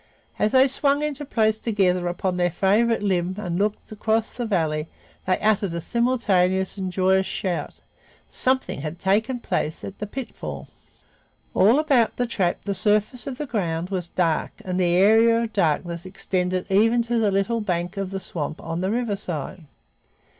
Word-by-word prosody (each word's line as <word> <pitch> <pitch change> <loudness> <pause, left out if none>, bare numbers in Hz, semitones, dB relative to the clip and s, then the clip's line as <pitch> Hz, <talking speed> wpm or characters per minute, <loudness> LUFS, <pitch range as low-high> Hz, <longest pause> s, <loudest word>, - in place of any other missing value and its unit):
As 210 - +2
they 260 +1 +6
swung 280 +2 +1
into 295 -1 -3
place 220 -5 +1
together 185 -6 +1
upon 180 +1 -2
their 175 0 +2
favorite 210 +6 +2
limb 185 -2 0
and 180 -4 -3
looked 210 +2 -2
across 220 +1 0
the 240 -2 -4
valley, 160 -6 0 0.4
they 185 - +3
uttered 205 -5 +1
a - - -2
simultaneous 190 -5 +1
and 190 -2 -4
joyous 190 +1 +2
shout. 185 -3 -3 0.5
Something 260 - +1
had 155 +3 -5
taken 220 +7 +1
place 155 -8 -2
at 195 - -8
the 210 - -4
pitfall! 250 +3 -7 0.8
All 215 +8 +5
about 275 -7 +2
the 245 - +1
trap 190 -7 -1
the 200 - -1
surface 210 +5 0
of 260 -2 -4
the 300 - -3
ground 180 - -2
was 180 -3 -2
dark 170 -3 0
and 185 0 -2
the 175 -1 +2
area 225 +4 +5
of 225 - -5
darkness 170 -1 0
extended 185 -1 -2
even 225 +4 +4
to 235 0 0
the 215 -2 +2
little 200 +4 0
bank 175 -2 -2
of 195 -1 -3
the 195 0 -4
swamp 160 -4 -5
on 165 +1 -4
the 190 - 0
riverside. 200 - -3
195 Hz, 170 wpm, -23 LUFS, 180-230 Hz, 0.8 s, they